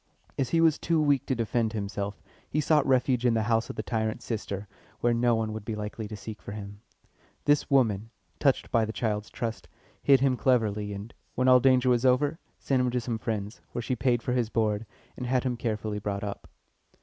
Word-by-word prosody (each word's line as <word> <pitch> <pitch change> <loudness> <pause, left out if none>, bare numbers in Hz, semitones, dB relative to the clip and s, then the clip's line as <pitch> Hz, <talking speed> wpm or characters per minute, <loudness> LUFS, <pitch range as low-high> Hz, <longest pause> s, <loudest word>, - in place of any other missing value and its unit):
As 130 -3 -1
he 165 +3 +3
was 160 -2 +4
too 165 -1 +1
weak 145 -4 +2
to 130 - +1
defend 115 -1 0
himself, 100 -1 -4 0.3
he 150 - 0
sought 150 -1 +3
refuge 130 -2 +2
in 120 -2 +3
the 110 - +1
house 115 0 +1
of - - -5
the - - -3
tyrant's 110 -2 -2
sister, 105 -3 -4 0.3
where 120 0 +2
no 120 0 +3
one 110 -1 -1
would 110 -1 -6
be 110 +1 -4
likely 105 +1 -5
to 105 - -7
seek 105 +2 -8
for 100 - -7
him. 100 -1 -8 0.6
This 145 0 +3
woman, 115 -6 +2 0.3
touched 135 -3 +2
by 115 -2 +3
the 110 - -2
child's 105 -3 -2
trust, 115 -1 -4 0.3
hid 135 -2 +5
him 130 -1 +2
cleverly, 105 -5 +1
and, 100 +3 -7 0.2
when 130 +1 +1
all 130 0 +8
danger 130 0 +4
was 120 0 +2
over, 135 +4 +3 0.2
sent 135 -2 +1
him 125 - +2
to 125 +1 0
some 115 -1 -3
friends, 105 -1 -4
where 120 - -2
she 130 - -1
paid 120 0 +1
for 125 - -1
his 120 -3 +1
board, 110 -1 0 0.3
and 125 - -5
had 125 0 +1
him 125 -2 -1
carefully 110 -3 -2
brought 100 -1 -3
up. 100 -1 -6
115 Hz, 215 wpm, -28 LUFS, 105-130 Hz, 0.6 s, all